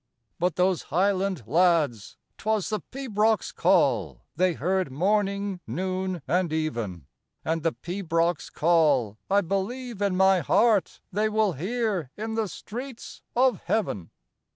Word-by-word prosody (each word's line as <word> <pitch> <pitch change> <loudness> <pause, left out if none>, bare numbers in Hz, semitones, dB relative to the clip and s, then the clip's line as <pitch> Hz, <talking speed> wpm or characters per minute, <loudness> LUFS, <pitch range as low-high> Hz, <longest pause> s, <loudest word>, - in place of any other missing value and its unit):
But 175 -1 +1
those 180 -1 +2
highland 190 -2 +1
lads, 160 - +2 0.2
'twas 215 -2 0
the 215 -1 -1
pibroch's 225 -3 0
call - - +2
They 185 -1 +2
heard 180 0 -1
morning, 200 +4 0
noon, 185 -2 -2
and 180 -2 +1
even, 115 - -3 0.4
And 165 +1 0
the 165 0 0
pibroch's 170 -2 -1
call, 145 -10 +2
I 200 +1 +4
believe 205 +5 -3
in 200 -2 +1
my 190 0 +5
heart, 210 - +2
They 210 +3 +1
will 215 -3 +2
hear 195 - -2
in 220 +1 -4
the 220 -1 0
streets 240 - -8
of 250 -4 +3
heaven. 105 - -1
185 Hz, 130 wpm, -26 LUFS, 165-210 Hz, 0.4 s, my